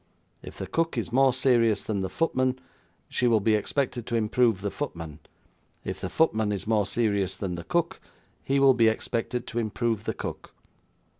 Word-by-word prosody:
If - - -11
the 95 - -4
cook 165 - -1
is - - -2
more 135 +2 +5
serious 120 -5 +2
than 100 -3 -2
the 95 - -2
footman, 130 - 0 0.5
she 125 - 0
will 115 -2 +4
be 110 +2 +2
expected 120 +2 -1
to 120 - -2
improve 115 -1 +2
the 100 0 -2
footman; 85 - -6 0.6
if - - -5
the - - -3
footman 110 -10 +2
is 100 - -3
more 105 -2 +1
serious 100 -3 0
than 95 -3 -3
the 85 -1 -5
cook, 170 - -1 0.4
he 140 +1 +1
will 135 -1 +6
be 115 -2 +4
expected 115 +2 -1
to 120 - -3
improve 110 0 -1
the - - -2
cook." - - -7
115 Hz, 180 wpm, -27 LUFS, 105-130 Hz, 0.6 s, will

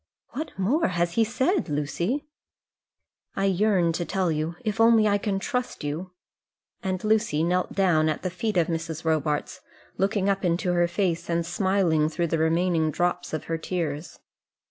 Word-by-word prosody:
"What 310 -4 -6
more 240 - +2
has 175 -1 0
he 225 +6 +3
said, 260 - 0
Lucy?" 170 - -1 1.1
"I 195 - 0
yearn 190 -3 +2
to 175 - -1
tell 185 0 0
you, 155 +2 -2
if 215 +1 0
only 225 -1 +6
I 205 0 +2
can 200 -1 -1
trust 250 - -3
you;" 155 +6 -4 0.7
and 185 -1 -2
Lucy 215 -8 +2
knelt 180 +2 0
down 165 -5 +3
at 155 - -3
the 185 - -2
feet 210 +3 -2
of 170 - +4
Mrs. 165 0 -4
Robarts, 155 +3 -1 0.4
looking 195 0 +1
up 195 0 +1
into 180 +1 +1
her 175 0 +3
face 170 -2 -1
and 170 0 0
smiling 175 -3 +1
through 170 +1 -1
the 165 - +2
remaining 165 0 +2
drops 175 +3 -1
of 155 - -3
her 165 0 -3
tears. 160 -3 -3
175 Hz, 165 wpm, -26 LUFS, 165-200 Hz, 1.1 s, only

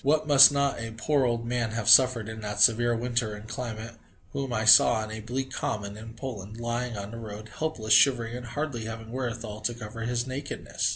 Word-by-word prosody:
What 155 +3 +2
must 140 -2 +8
not 140 -2 0
a 115 -1 -7
poor 140 +3 +1
old 120 -1 -1
man 120 -2 -2
have 115 -1 -4
suffered 115 -1 +6
in 110 0 -8
that 105 0 -5
severe 120 +2 +4
weather 120 -2 -2
and 105 +1 -11
climate, 115 -2 -7 0.4
whom 135 -2 -4
I 110 -2 -1
saw 110 - +8
on 110 0 -3
a 110 - -6
bleak 130 +4 -4
common 105 -8 -4
in 110 +1 -11
Poland, 110 -4 -8
lying 120 0 -3
on 100 +1 -7
the 115 - -8
road, 110 -1 -9
helpless, 125 -9 -1
shivering 120 0 +3
and 125 -1 -8
hardly 135 -3 -4
having 115 0 -8
wherewithal 115 -4 -5
to 120 +2 -2
cover 115 0 -9
his 120 +1 -2
nakedness? 135 +2 -4
115 Hz, 210 wpm, -26 LUFS, 110-125 Hz, 0.4 s, must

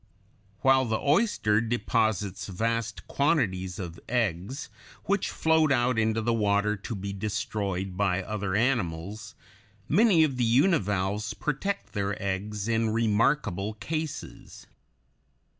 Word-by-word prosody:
] 100 -1 -35
While 130 0 +5
the 110 -2 0
oyster 140 - +2
deposits 110 -4 0
vast 115 +3 -2
quantities 95 - 0
of 85 -3 -6
eggs, 120 - -1 0.4
which 200 0 0
float 160 -2 +2
out 120 -2 +2
into 110 0 +1
the 120 +1 +1
water 105 -1 +2
to 100 +3 -6
be 100 0 -5
destroyed 95 -2 -3
by 95 -1 +1
other 105 -1 -3
animals, 105 -3 -1 0.5
many 190 - +5
of 140 -5 0
the 125 - +1
univalves 105 - +1
protect 155 +7 -3
their 100 0 -2
eggs 100 +2 -3
in 115 -1 +1
remarkable 110 -2 +1
cases. 155 +6 -6
110 Hz, 120 wpm, -27 LUFS, 100-125 Hz, 0.5 s, While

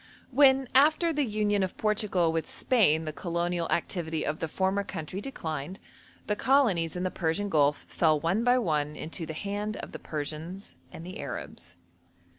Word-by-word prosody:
When, 265 0 +5
after 310 +5 +4
the 295 - 0
union 210 -3 0
of 190 -1 -2
Portugal 210 -5 +1
with 165 0 -2
Spain, 165 - +3
the 155 - -4
colonial 170 0 -2
activity 165 -2 -1
of 155 - -2
the 165 - -2
former 190 +5 0
country 185 0 -5
declined, 165 - -5 0.5
the 210 - 0
colonies 210 - +2
in 180 - -2
the 185 - -1
Persian 185 +4 -1
Gulf 145 -3 +2
fell 155 -3 +2
one 175 +9 0
by 245 +1 +4
one 150 -9 0
into 160 +2 -5
the 160 - -4
hand 205 +3 -3
of - - -7
the - - -7
Persians 160 +6 -6 0.2
and 165 - -9
Arabs. 85 +1 -7
180 Hz, 165 wpm, -28 LUFS, 160-210 Hz, 0.5 s, When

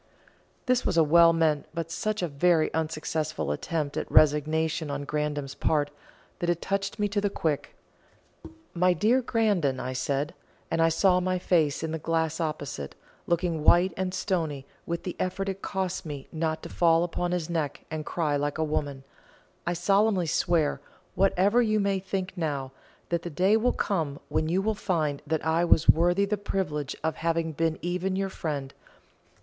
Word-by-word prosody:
This 255 -1 +2
was - - 0
a 165 - +7
well 165 +2 +6
meant 160 -3 +1
but 165 -1 -3
such 215 +3 -2
a - - +1
very 160 +2 +2
unsuccessful 155 - -2
attempt 145 - -2
at - - -4
resignation 155 +1 +3
on 140 0 -3
Grandon's 150 -2 -2
part, 145 -2 0 0.5
that 175 - -1
it 175 -1 +1
touched 195 +3 -2
me 210 -1 +1
to 205 0 0
the 205 - +1
quick. 155 -6 -2 1.0
"My 180 +1 +3
dear 220 +9 +3
Grandon," 205 - +1
I 130 - -3
said 140 +4 -1 0.4
and 165 - +1
I 165 - +5
saw 180 +3 +3
my 185 0 0
face 165 -5 +1
in 160 - -2
the 160 - -3
glass 160 0 -1
opposite, 150 - -4 0.3
looking 170 -2 0
white 175 +3 +5
and 185 0 -2
stony 160 -8 -2 0.2
with 170 0 -3
the 180 - -4
effort 190 +2 -2
it 195 0 -4
cost 190 -2 -2
me 145 -4 -7
not 160 0 -2
to - - -7
fall 165 -1 +3
upon 175 0 -2
his 175 -3 -1
neck 160 -4 -3
and 155 -1 -3
cry 150 -2 -1
like 145 +1 -1
a 160 - +1
woman 145 -3 -2 0.6
"I 175 - +1
solemnly 195 +2 +2
swear, 160 -1 +1 0.3
whatever 195 +4 +3
you 215 -2 +2
may 200 -1 +1
think 190 -1 -4
now, 145 -6 -2 0.4
that 170 -1 0
the 175 - -5
day 185 +7 +3
will 235 +3 +3
come 160 -9 -1
when 155 - 0
you 185 +3 +1
will 220 +1 +1
find 160 -8 -1
that 160 0 -1
I 160 +1 +2
was 165 -2 +3
worthy 175 +4 +4
the 210 +1 -1
privilege 165 -8 -3
of 160 - -1
having 165 0 0
been 160 +1 0
even 180 +2 -1
your 195 0 -1
friend. 145 -7 -4
165 Hz, 175 wpm, -27 LUFS, 150-185 Hz, 1.0 s, a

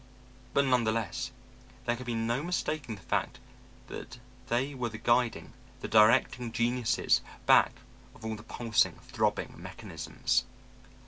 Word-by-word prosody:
But, 140 - +4
none 125 -2 +3
the 110 - +2
less, 110 -5 -2 0.6
there 120 0 +1
could 125 +1 -9
be 120 - -1
no 115 +3 0
mistaking 155 -7 -2
the 95 - -15
fact - - -1 0.5
that - - -8 0.3
they 130 +5 0
were 125 -3 -2
the 110 - -7
guiding, 120 +1 +1 0.3
the - - -3
directing 115 +2 +4
geniuses 120 0 +2 0.2
back - - +6 0.4
of 110 - -12
all 110 0 -2
the 105 - -10
pulsing, 115 0 +1
throbbing - - -1
mechanisms. - - -2
120 Hz, 140 wpm, -30 LUFS, 110-125 Hz, 0.6 s, back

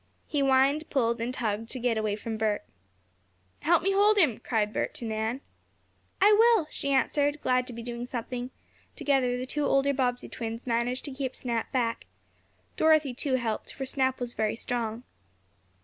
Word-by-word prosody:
He 295 - -2
whined, 275 +3 +3
pulled 235 -4 +1
and 235 +2 -1
tugged 225 -3 -2
to 260 - -4
get 240 -1 +1
away 215 -2 0
from 220 +1 -5
Bert. 215 -1 -1 0.9
"Help 335 +1 +3
me 390 - +2
hold 410 +2 +4
him!" 300 - +3
cried 220 -3 -1
Bert - - -2
to 235 - -6
Nan. 220 +4 -2 0.8
"I 415 +2 +6
will!" 450 -4 +5
she 280 - -3
answered, 285 +2 +2
glad 255 0 +2
to 250 - -7
be 230 0 -7
doing 240 0 -5
something. 245 0 -4 0.5
Together 260 -3 +1
the 250 - -3
two 295 +3 -2
older 275 +1 +3
Bobbsey 250 -2 -1
twins 230 0 -6
managed 240 +1 -1
to 285 - -4
keep 260 -1 -4
Snap 235 -3 -2
back. 235 -3 -1 0.7
Dorothy, 310 -4 +4
too, 260 +2 -1
helped, 230 -4 -2
for 270 - -5
Snap 260 0 0
was 245 -1 -4
very 215 0 0
strong. 230 -1 -3
250 Hz, 175 wpm, -28 LUFS, 230-280 Hz, 0.9 s, I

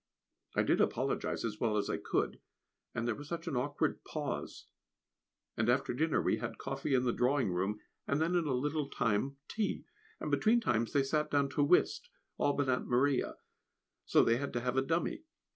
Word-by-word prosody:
I - - +3
did - - +3
apologise - - 0
as 105 -2 -4
well 110 -3 +1
as 105 - 0
I - - -1
could, - - -1 0.6
and 115 - -1
there 120 - +1
was 145 +6 -9
such 170 +1 -4
an 155 - -2
awkward 140 +4 -1
pause; - - -4 0.9
and 110 +1 +1
after 125 +1 +2
dinner 155 +5 +1
we - - +1
had 115 -1 -5
coffee 135 +1 -1
in 125 - +3
the 120 -2 +1
drawing 130 -4 +2
room, 95 +4 -1 0.3
and 140 - +1
then 165 +3 +1
in 175 -3 +2
a 135 - +1
little 145 +2 -1
time 125 +6 0
tea, 215 -2 -2 0.3
and - - -3
between 225 +2 +4
times 115 - 0
they 140 - +4
sat 150 +2 0
down 140 -1 +2
to 145 +2 +1
whist, 180 - +3 0.3
all 145 - +2
but 140 -1 0
Aunt 125 -1 0
Maria 130 +2 +2 0.7
so - - +4
they 115 - +3
had 140 +2 -4
to 120 - -1
have 125 +1 -1
a 135 - +4
dummy. 165 - -1
135 Hz, 195 wpm, -33 LUFS, 120-150 Hz, 0.9 s, between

